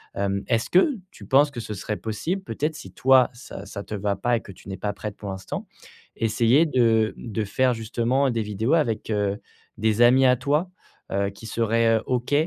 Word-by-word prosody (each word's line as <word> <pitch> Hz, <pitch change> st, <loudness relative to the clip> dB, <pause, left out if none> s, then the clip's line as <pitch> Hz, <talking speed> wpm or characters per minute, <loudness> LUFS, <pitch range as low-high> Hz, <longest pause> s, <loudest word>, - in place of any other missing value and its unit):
Hem, 100 Hz, 0 st, -1 dB
est-ce 115 Hz, -1 st, 0 dB
que 190 Hz, -, +4 dB, 0.2 s
tu -, -, -13 dB
penses 145 Hz, +2 st, +4 dB
que 130 Hz, -, -7 dB
ce 110 Hz, -2 st, -5 dB
serait 105 Hz, +2 st, -4 dB
possible 115 Hz, -, -3 dB
peut-être, 155 Hz, -3 st, -2 dB
si 150 Hz, -, -10 dB
toi 130 Hz, -1 st, +5 dB
ça 120 Hz, -4 st, -10 dB
ça 100 Hz, +1 st, -6 dB
te -, -, -9 dB
va 100 Hz, 0 st, -1 dB
pas 120 Hz, +2 st, +1 dB
et -, -, -6 dB
que -, -, -11 dB
tu -, -, -17 dB
n'es 95 Hz, -, -5 dB
pas 100 Hz, +2 st, -3 dB
prête 105 Hz, 0 st, -7 dB
pour 100 Hz, -, -7 dB
l'instant, 95 Hz, 0 st, -6 dB, 0.5 s
essayer 115 Hz, +7 st, +3 dB
de 115 Hz, -6 st, +2 dB
de 110 Hz, -2 st, -4 dB
faire 125 Hz, +5 st, +1 dB
justement 120 Hz, +4 st, 0 dB
des 115 Hz, -1 st, -1 dB
vidéos 105 Hz, +7 st, 0 dB
avec, 115 Hz, -11 st, 0 dB
heu, 100 Hz, -1 st, 0 dB, 0.4 s
des 110 Hz, +1 st, +1 dB
amis 130 Hz, +2 st, +6 dB
à 125 Hz, -1 st, +5 dB
toi, 150 Hz, +8 st, 0 dB, 0.4 s
heu, 100 Hz, 0 st, 0 dB
qui 105 Hz, +3 st, -11 dB
seraient 115 Hz, 0 st, +2 dB
OK 125 Hz, +2 st, -2 dB
115 Hz, 200 wpm, -24 LUFS, 105-130 Hz, 0.5 s, amis